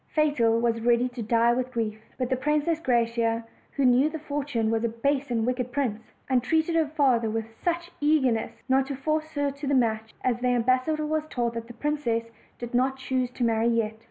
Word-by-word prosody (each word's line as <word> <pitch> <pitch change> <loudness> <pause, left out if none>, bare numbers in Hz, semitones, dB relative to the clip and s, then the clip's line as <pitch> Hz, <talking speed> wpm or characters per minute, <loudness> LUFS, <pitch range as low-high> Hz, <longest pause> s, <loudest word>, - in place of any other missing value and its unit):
Fatal 255 -7 +3
was 230 -1 0
ready 240 +1 +3
to 245 -1 -7
die 230 +2 +3
with 255 +1 -1
grief; 220 -3 -2 0.2
but 255 0 -2
the - - +3
Princess 300 +4 0
Graciosa, 230 -4 +1 0.3
who 280 - +1
knew 255 +4 +5
that 315 -1 -6
Fortune 285 -7 -1
was 225 0 0
a 235 - +1
base 275 +5 -1
and 230 -2 0
wicked 250 0 -1
prince, 235 -6 -2 0.2
entreated 315 +6 +1
her 320 -2 +3
father 265 -7 +2
with 225 0 -2 0.2
such 345 0 -1
ear 295 -4 +3
nestness, 225 -1 -2
not 265 0 +2
to 280 - -3
force 310 +3 -2
her 285 -1 +1
to 280 +1 -7
the 280 - +2
match 220 -3 0
that 245 -1 0
the 250 - +1
ambas 255 +2 +2
sador 305 -1 -1
was 310 0 -1
told 240 -2 -1
the 230 - -3
princess 235 -5 -1 0.3
did 240 0 -7
not 260 +2 +2
choose 260 -1 -1
to 250 0 -4
marry 225 0 +2
yet. 230 -2 +1
250 Hz, 210 wpm, -26 LUFS, 230-285 Hz, 0.3 s, knew